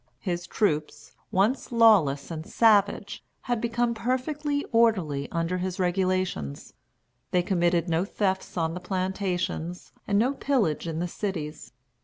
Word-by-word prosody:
His 175 -3 -3
troops, 155 -8 -1 0.2
once 210 +10 +1
lawless 195 - +4
and 160 -1 -4
savage, 205 -1 +2 0.2
had 240 -2 -2
become 235 0 0
perfectly 285 +5 -1
orderly 185 - +2
under 170 +2 -1
his 185 +1 -3
regulations. 185 - -1 0.6
They 180 -1 +2
committed 175 -1 +1
no 165 +1 +1
thefts 190 -2 -2
on 165 -1 0
the 180 - -5
plantations 185 -2 -3 0.2
and 200 - +2
no 245 +6 +3
pillage 245 - 0
in 160 -1 -3
the 175 +2 -1
cities. 165 -8 -5
185 Hz, 130 wpm, -26 LUFS, 170-225 Hz, 0.6 s, lawless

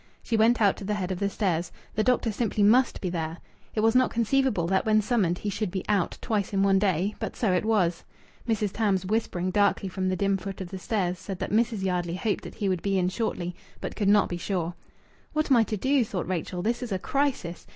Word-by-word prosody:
She 230 - -1
went 225 +2 +4
out 205 -3 +3
to - - -8
the 210 +2 -1
head 190 -2 -3
of 180 - -3
the 200 - +1
stairs. 180 -5 -1 0.2
The 215 - +1
doctor 245 -2 +2
simply 210 -1 0
must 240 +5 +4
be 185 - -1
there. 165 -1 -3 0.4
It 215 - +1
was 225 +1 +4
not 255 0 +4
conceivable 235 -5 +1
that 190 +2 +1
when 215 -1 +3
summoned 205 -5 +1
he 205 - -3
should 210 0 -2
be 185 +1 -4
"out" 200 -4 +1
twice 210 -3 -1
in 195 0 +2
one 195 -1 +4
day, 195 0 +1
but - - -4
so 210 -6 +1
it 180 - +1
was. 185 -6 +1 0.5
Mrs. 210 -3 +1
Tams, 195 -4 0
whispering 185 -3 -1
darkly 200 0 +2
from 185 +1 -2
the 185 - 0
dim 195 +1 +1
foot 195 0 -7
of 185 -2 -6
the 190 - -6
stairs, 185 -2 -1
said 190 0 -6
that - - -4
Mrs. 220 -2 +1
Yardley 175 -2 -1
hoped 205 +3 -1
that - - -8
he 205 - -2
would 185 -3 0
be 195 -1 0
in 180 -1 +2
shortly, 180 -4 -3 0.2
but - - -5
could 205 -3 +1
not 205 0 +5
be 175 - -4
sure. 175 -2 -2 0.6
"What 305 -1 0
am 255 - +7
I 230 - +5
to 215 - -3
do?" 265 +5 +2
thought 190 -6 -4
Rachel. 180 0 -3
"This 235 +4 0
is 245 -3 -5
a 190 - +1
crisis. 260 -7 -2
200 Hz, 245 wpm, -27 LUFS, 185-220 Hz, 0.6 s, am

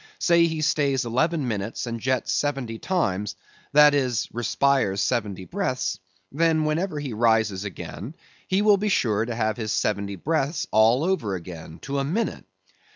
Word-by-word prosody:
Say 170 -1 +4
he 160 -1 -3
stays 145 -5 +1
eleven 145 +5 0
minutes, 105 0 -3
and 115 -1 -4
jets 130 +2 0
seventy 135 -6 -1
times, 105 - -1 0.4
that 150 0 +7
is, 130 -5 0
respires 120 -3 +1
seventy 100 -1 -1
breaths; 130 - -2 0.3
then 160 +1 +2
whenever 155 +1 -1
he 140 -5 -4
rises 110 -3 +2
again, 100 - -7 0.3
he 190 +2 +1
will 210 -1 +6
be 210 +2 -1
sure 110 - +1
to 115 0 -4
have 110 -2 0
his 110 -2 -3
seventy 100 -1 -1
breaths 150 - -1
over 115 - +3
again, 85 -2 -9
to 140 0 -2
a - - 0
minute. 185 +12 -2
125 Hz, 155 wpm, -24 LUFS, 105-155 Hz, 0.4 s, that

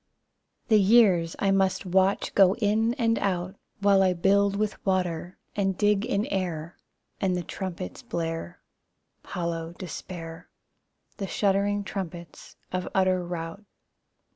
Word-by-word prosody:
The 215 -2 +6
years 190 -5 +4
I 195 - +1
must 195 0 +1
watch 190 +2 +2
go 195 -1 +5
in 225 +1 +1
and 230 -4 +1
out, 185 -1 -1 0.3
While 200 -1 +5
I 185 -1 +4
build 200 +3 +3
with 210 0 -2
water, 180 -2 -1 0.2
and 195 -2 0
dig 210 0 +2
in 205 -3 0
air, 175 -3 -3 0.4
And 185 -2 +1
the 175 - -3
trumpets 185 +1 -6
blare 165 +1 -4 0.6
Hollow 170 -2 -4
despair, 170 -2 -8 0.7
The 195 - -3
shuddering 200 +1 +1
trumpets 175 -5 -7 0.2
of 185 0 -2
utter 185 -1 +2
rout. 175 +2 -6
190 Hz, 125 wpm, -27 LUFS, 175-200 Hz, 0.7 s, The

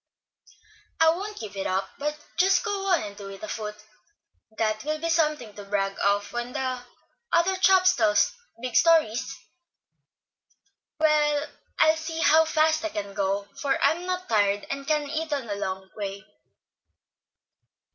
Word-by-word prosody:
"I 325 0 +6
won't 405 +5 -5
give 205 -2 -7
it 195 - -2
up, 190 +1 -1
but 300 +1 -2 0.2
just 375 +1 +3
go 395 -1 -2
on 360 - +3
and 205 -1 -7
do 200 -1 -9
it 195 +1 -10
afoot. 210 -1 -5 0.8
That 215 -1 0
will 305 +1 -2
be 335 +1 -2
something 305 -9 +1
to 205 - -9
brag 195 -1 -1
of 205 +1 +1
when 240 +1 -4
the 255 -1 -2 0.5
other 365 +3 +3
chaps 375 -1 +5
tell 215 -4 +2 0.4
big 245 -1 -5
stories. 265 -4 +3 1.6
I'll 300 +1 +2
see 320 0 -5
how 320 +1 +5
fast 315 0 +2
I 325 - -1
can 200 -7 -5
go, 200 0 -1
for 275 -2 +1
I'm 330 +5 +1
not 365 0 -3
tired, 205 -2 +2
and 275 0 -5
can 300 -1 +1
eat 315 +1 -3
on 280 -4 -1
the 190 -2 -4
way. 200 -1 -5
275 Hz, 145 wpm, -26 LUFS, 205-320 Hz, 1.6 s, I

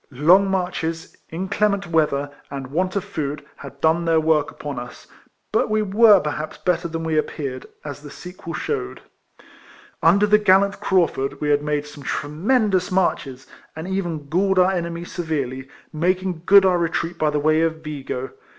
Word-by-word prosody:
Long 175 +9 +4
marches, 175 -3 -3
inclement 200 +3 0
weather, 150 -4 0 0.2
and 140 -1 -5
want 185 +5 -1
of 200 - 0
food, 150 -7 -4
had 140 0 -11
done 160 +2 +3
their 165 -1 +3
work 155 -2 +2
upon 145 -4 -6
us; 125 0 -10 0.5
but - - +1
we 215 0 +1
w^ere 210 0 +5
perhaps 150 0 -4
better 170 +2 0
than 165 0 -5
we 160 -1 +1
appeared, 135 -4 -4 0.2
as 145 -1 -7
the 145 - -10
sequel 175 0 -8
shewed. 60 - -3 1.0
Under 195 +5 +5
the 210 0 +4
gallant 200 0 +3
Crauftird 170 -7 0
we 150 - -1
had 145 0 +3
made 150 -1 -1
some 150 0 -12
tremendous 185 - 0
marches, 135 -8 -1 0.3
and 160 +3 -6
even 175 -6 -3
galled 190 +5 +1
our 185 +1 +5
enemies 170 -1 -4
severely, 135 -6 -3 0.2
making 180 +1 -1
good 200 0 +8
our 180 -2 +3
retreat 170 0 -2
by 155 - +2
the 150 - -1
way 155 +2 +2
of 160 -1 -1
Vigo. 135 -4 -5
165 Hz, 165 wpm, -22 LUFS, 150-185 Hz, 1.0 s, good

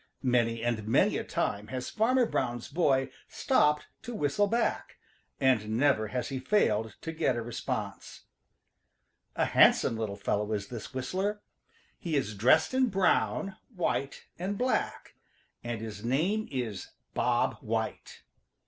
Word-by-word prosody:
Many 115 -2 +1
and 115 -3 -1
many 110 - +3
a - - -3
time 105 +1 -2
has 130 0 -5
Farmer 245 +3 +3
Brown's 120 - -2
boy 135 -6 +2 0.2
stopped 150 - +2 0.2
to 240 - -6
whistle 205 +4 +1
back, 230 +3 -1 0.4
and 110 -5 +2
never 130 -5 +3
has 125 +6 -3
he 135 -2 -3
failed 110 - +1
to 165 - -4
get 155 -5 0
a 120 - -2
response. 120 0 -5 1.1
A - - +2
handsome - - +5
little 110 -3 -3
fellow 105 +1 -1
is 100 -1 -3
this 115 -3 -7
whistler. 190 +11 -2 0.6
He 165 -3 -2
is 120 -7 0
dressed 130 - +4
in 260 0 +3
brown, 195 0 +1 0.2
white 140 -5 -2
and 195 +3 -2
black, 255 +1 -1 0.5
and 120 -2 -4
his 105 -2 -7
name 170 - 0
is 120 -7 -4 0.2
Bob - - +1
White. - - -4
130 Hz, 140 wpm, -29 LUFS, 115-185 Hz, 1.1 s, handsome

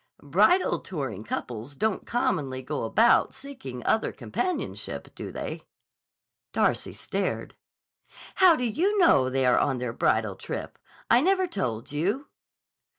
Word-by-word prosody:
"Bridal 210 - +3
touring 135 - -5
couples 120 +4 -5
don't 215 +5 -1
commonly 145 - -1
go 145 -2 -3
about 225 - +4
seeking 135 - -8
other 220 - +2
companionship, 365 -1 -4
do - - -7
they?" - - -5 0.9
Darcy - - +1
stared. - - -3 0.8
"How 370 -3 +7
do 250 - -1
you 360 - +1
know 140 - +5
they 135 0 +1
are 125 - +4
on 135 -3 +1
their 125 -2 -3
bridal 110 -4 +1
trip? - - -6 0.3
I 235 - +7
never 375 +3 +3
told 135 - -3
you." 200 - -1
155 Hz, 130 wpm, -27 LUFS, -, 0.9 s, How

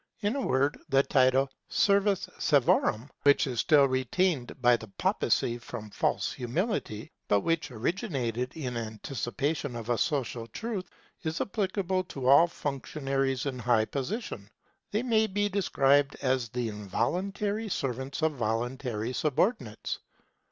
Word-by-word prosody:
In 210 +4 0
a 280 - -1
word 140 - +1
the 135 0 +4
title, 130 0 +3 0.2
servus 200 -1 +2
servorum, 135 -3 +2
which 145 0 +5
is 125 -4 -3
still 145 -3 +5
retained 130 +2 0
by 125 -1 +5
the 110 -1 -7
Papacy 115 +4 0
from 110 -3 -8
false - - 0
humility, 125 - -2 0.2
but 100 -1 +3
which 165 +2 0
originated 125 - -2
in 125 -6 -3
anticipation 120 +5 -3
of 115 0 -6
a 120 - +1
social 125 -6 -1
truth, 205 - -5 0.3
is 160 -1 -3
applicable 190 -2 -1
to 135 -7 -6
all 140 +6 +7
functionaries 135 -3 -2
in 130 -3 -3
high 120 -2 +3
position. 135 - -4 0.4
They 215 +3 -1
may 220 -3 +3
be 205 +1 0
described 145 -8 +2
as 130 -3 0
the 120 +1 -2
involuntary 195 - -2
servants 135 - -3
of 160 - +4
voluntary 120 0 -2
subordinates. 135 - -1
135 Hz, 130 wpm, -29 LUFS, 120-180 Hz, 0.4 s, all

